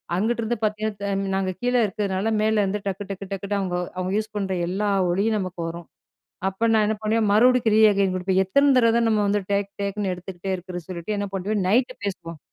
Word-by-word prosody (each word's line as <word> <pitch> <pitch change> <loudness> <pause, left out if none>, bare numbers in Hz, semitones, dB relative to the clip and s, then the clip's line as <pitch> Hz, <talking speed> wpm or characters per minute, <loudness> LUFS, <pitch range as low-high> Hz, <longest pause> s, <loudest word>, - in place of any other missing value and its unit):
அங்கிட்டுதுருந்து 230 +3 0
பார்த்தீங்கன்னா, 210 -1 -2 0.2
நாங்க 190 -1 0
கீழ 245 0 0
இருக்கிறதுனால 200 +1 -1
மேலருந்து 210 -2 +1
டக்கு, 195 +1 -3
டக்கு, 195 0 -5
டக்குன்னு 200 +1 -2
அவங்க, 180 -2 -2 0.2
அவங்க 185 0 -2
யூஸ் 215 0 -3
பண்ற 195 -2 -1
எல்லா 200 +3 -1 0.2
ஒலியும் 210 +4 +1
நமக்கு 185 -2 -5
வரும். 170 0 -8 0.6
அப்ப 195 +4 -1
நான் 220 -1 +4
என்ன 220 0 0
பண்ணுவேன் 215 -1 +1
மறுபடிக்கும் 235 0 +4
ரீஅகெயின் 200 -3 +4
குடுப்பேன். 190 +1 +1
எத்தன 280 +9 +4
தடவ 230 -2 +4
தான் 230 - +2
நம்ம 210 -1 +2
வந்து, 205 +1 +2
டேக் 200 0 0
டேக்ன்னு 200 -1 -2
எடுத்துகிட்டே 180 +1 -6
இருக்கிறதுனு 180 -1 -8
சொல்லிட்டு 185 +4 -4
என்ன 200 0 -2
பண்ணுவேன். 200 +2 -1
நைட் 250 +5 +2
பேசுவோம். 170 -4 -5
200 Hz, 180 wpm, -24 LUFS, 190-215 Hz, 0.6 s, நான்